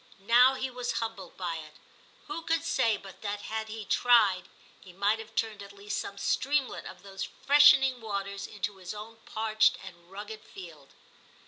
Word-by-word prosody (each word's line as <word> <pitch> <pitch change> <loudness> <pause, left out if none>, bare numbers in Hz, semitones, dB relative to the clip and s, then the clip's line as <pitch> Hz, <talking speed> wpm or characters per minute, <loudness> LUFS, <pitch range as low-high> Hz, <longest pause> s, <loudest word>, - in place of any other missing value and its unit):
Now 250 +3 +7
he 260 0 -3
was 245 0 -3
humbled 225 -4 -5
by 175 -3 -3
it. 155 -1 -11 0.5
Who 300 +3 -5
could 330 -1 0
say 225 -2 +2
but 195 -2 -13
that 205 -1 -3
had 220 0 -4
he 220 -1 -7
tried, 210 -6 +4 0.3
he 185 - -15
might 200 +4 +1
have 220 0 -11
turned 220 -3 -1
at 200 0 -10
least 200 +1 -4
some 200 - -6
streamlet 275 +6 0
of 185 0 -11
those 195 -1 -6 0.2
freshening 270 -3 +6
waters 200 -2 -4
into 205 -1 -4
his 185 +2 -7
own 220 +2 -9
parched 220 0 +2
and 175 -2 -12
rugged 210 +3 -8
field 160 -7 -12
210 Hz, 170 wpm, -29 LUFS, 195-230 Hz, 0.5 s, Now